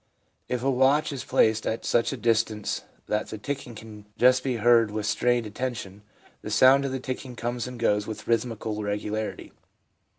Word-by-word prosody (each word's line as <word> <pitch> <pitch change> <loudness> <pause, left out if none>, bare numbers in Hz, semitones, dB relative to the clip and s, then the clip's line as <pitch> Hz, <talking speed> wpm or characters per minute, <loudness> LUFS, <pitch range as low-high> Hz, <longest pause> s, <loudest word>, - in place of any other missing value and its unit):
If 125 -1 -2
a 135 - +2
watch 135 +4 +3
is 135 - -5
placed 110 0 +2
at 110 - -2
such 115 - +2
a 135 - -4
distance 110 -2 0 0.2
that 105 - -1
the 110 - -6
ticking 130 0 -5
can 105 -1 -11
just 125 +1 +4
be 130 -2 -1
heard 115 0 +4
with 105 0 -3
strained 120 +2 +1
attention, 105 -3 -5 0.4
the - - -6
sound 135 +2 +5
of 135 - -2
the 130 - -2
ticking 130 0 -6
comes 120 0 -3
and 125 -1 -8
goes 105 -2 +1
with 110 - -7
rhythmical 115 -2 -1
regularity. 105 +1 -3
115 Hz, 175 wpm, -26 LUFS, 110-125 Hz, 0.4 s, sound